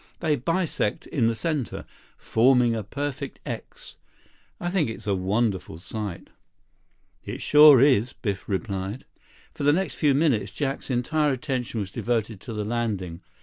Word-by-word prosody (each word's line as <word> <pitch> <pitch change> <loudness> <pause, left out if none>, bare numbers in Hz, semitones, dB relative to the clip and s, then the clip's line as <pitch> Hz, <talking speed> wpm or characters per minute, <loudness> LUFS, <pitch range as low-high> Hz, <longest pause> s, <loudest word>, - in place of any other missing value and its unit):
They 155 -2 +1
bisect 165 - -1
in 125 -8 +1
the 115 - +1
center, 150 -2 -3 0.3
forming 125 0 +3
a 115 - -2
perfect 140 +5 -5
'X.' - - -7 0.6
I 175 - -2
think 180 -10 +1
it's 115 - -7
a 100 - +1
wonderful 95 -2 -1
sight." 100 +1 -6 0.9
"It - - -6
sure 150 -2 +8
is," 130 -3 +4
Biff 100 -4 -4
replied. 100 +3 -3 0.5
For - - -6
the 145 - +5
next 170 -3 0
few 145 -1 +2
minutes, 140 -7 +1
Jack's 140 -2 -3
entire 145 +4 +1
attention 125 -4 -3
was 95 -2 -5
devoted 110 -3 -2
to 115 - -7
the 105 -1 -3
landing. 105 -7 -2
120 Hz, 145 wpm, -25 LUFS, 105-145 Hz, 0.9 s, sure